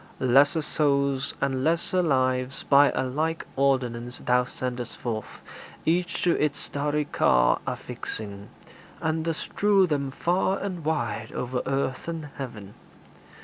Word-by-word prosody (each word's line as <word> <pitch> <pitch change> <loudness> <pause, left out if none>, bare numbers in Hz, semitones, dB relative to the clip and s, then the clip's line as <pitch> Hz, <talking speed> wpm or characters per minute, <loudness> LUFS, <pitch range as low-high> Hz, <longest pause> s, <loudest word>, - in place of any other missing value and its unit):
Lesser 140 +5 +4
souls 140 -2 +1
And 135 -1 0
lesser 170 +3 +2
lives 130 -4 +1
by 140 0 +6
a - - +1
like 155 +5 -1
ordinance 125 -3 0
Thou 125 0 +2
sendest 125 -1 -5
forth, 110 -3 -5 0.4
each 175 +1 0
to 175 - +4
its 145 -1 0
starry 150 +1 -1
car - - +3
Affixing, 100 -2 -6 0.5
and 160 0 -1
dost 165 -1 -2
strew 200 -2 +3
them 145 -5 -1
far 180 +7 +1
and 185 -4 -4
wide 120 -8 -2
O'er 125 0 -2
earth 135 0 -1
and 160 -3 -4
heaven. 105 -7 -7
140 Hz, 130 wpm, -26 LUFS, 125-160 Hz, 0.5 s, by